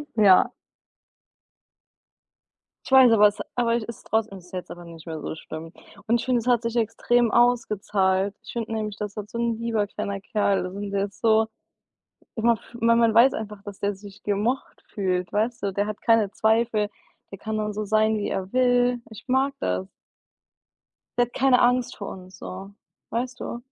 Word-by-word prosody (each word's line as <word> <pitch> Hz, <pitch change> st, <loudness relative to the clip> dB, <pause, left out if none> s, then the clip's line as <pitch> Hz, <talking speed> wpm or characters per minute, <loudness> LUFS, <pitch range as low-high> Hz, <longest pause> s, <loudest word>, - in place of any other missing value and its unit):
Ja. 200 Hz, -4 st, +6 dB, 2.3 s
Ich -, -, -9 dB
weiß, 260 Hz, -3 st, +8 dB
aber 210 Hz, -1 st, +7 dB
es 205 Hz, -, -7 dB, 0.2 s
aber 235 Hz, -1 st, +2 dB
ist 235 Hz, 0 st, -6 dB
trotzdem 220 Hz, -3 st, -1 dB
ist 180 Hz, +1 st, -17 dB
jetzt 180 Hz, -1 st, -6 dB
aber 175 Hz, 0 st, -9 dB
nicht 165 Hz, -1 st, -12 dB
mehr 160 Hz, -1 st, -5 dB
so -, -, -5 dB
schlimm 160 Hz, +1 st, -9 dB, 0.3 s
und 235 Hz, +1 st, +2 dB
ich -, -, -5 dB
finde, 255 Hz, -2 st, +2 dB
es 230 Hz, -, -10 dB
hat 240 Hz, -2 st, +3 dB
sich 230 Hz, +1 st, -3 dB
extrem 235 Hz, +1 st, +2 dB
ausgezahlt. 205 Hz, -5 st, +2 dB
Ich 225 Hz, -, -10 dB
finde 230 Hz, -2 st, -4 dB
nämlich, 215 Hz, -2 st, -3 dB
das 210 Hz, 0 st, -5 dB
wird 210 Hz, 0 st, -6 dB
so 235 Hz, -, -5 dB
'n 235 Hz, -1 st, 0 dB
lieber 225 Hz, -3 st, 0 dB
kleiner 200 Hz, -1 st, -4 dB
Kerl, 195 Hz, -3 st, 0 dB
sind 200 Hz, +1 st, -5 dB
jetzt 200 Hz, 0 st, -2 dB
so 220 Hz, -1 st, +3 dB, 0.9 s
immer 235 Hz, +1 st, +3 dB
f 230 Hz, +1 st, -11 dB
man 230 Hz, 0 st, +4 dB
man 230 Hz, -1 st, +4 dB
weiß 245 Hz, +3 st, +6 dB
einfach, 210 Hz, -2 st, -6 dB
dass 205 Hz, -2 st, -9 dB
der 200 Hz, 0 st, -1 dB
sich 200 Hz, +1 st, -13 dB
gemocht 210 Hz, +6 st, -2 dB
fühlt, 180 Hz, -3 st, -1 dB
weißt 225 Hz, +2 st, -1 dB
du? 195 Hz, -1 st, -1 dB
Der 205 Hz, +2 st, 0 dB
hat 215 Hz, -, -5 dB
keine 225 Hz, -4 st, +3 dB
Zweifel, 220 Hz, -1 st, +1 dB, 0.4 s
der 195 Hz, -, -7 dB
kann 220 Hz, 0 st, -3 dB
dann 210 Hz, -1 st, -2 dB
so 215 Hz, 0 st, -3 dB
sein, 215 Hz, +1 st, +2 dB
wie 205 Hz, -, -2 dB
er 190 Hz, 0 st, -3 dB
will. 245 Hz, -1 st, +3 dB
Ich 220 Hz, -, -12 dB
mag 265 Hz, +2 st, +2 dB
das. 90 Hz, +1 st, -2 dB, 1.3 s
Der 240 Hz, -, +4 dB
hat 240 Hz, -, -22 dB
keine 265 Hz, -2 st, +4 dB
Angst 245 Hz, 0 st, +2 dB
vor 200 Hz, -, -6 dB
uns 185 Hz, 0 st, -11 dB
so, 190 Hz, +2 st, -8 dB, 0.4 s
weißt 245 Hz, +2 st, -3 dB
du? 235 Hz, -, -4 dB
215 Hz, 185 wpm, -25 LUFS, 200-235 Hz, 2.3 s, weiß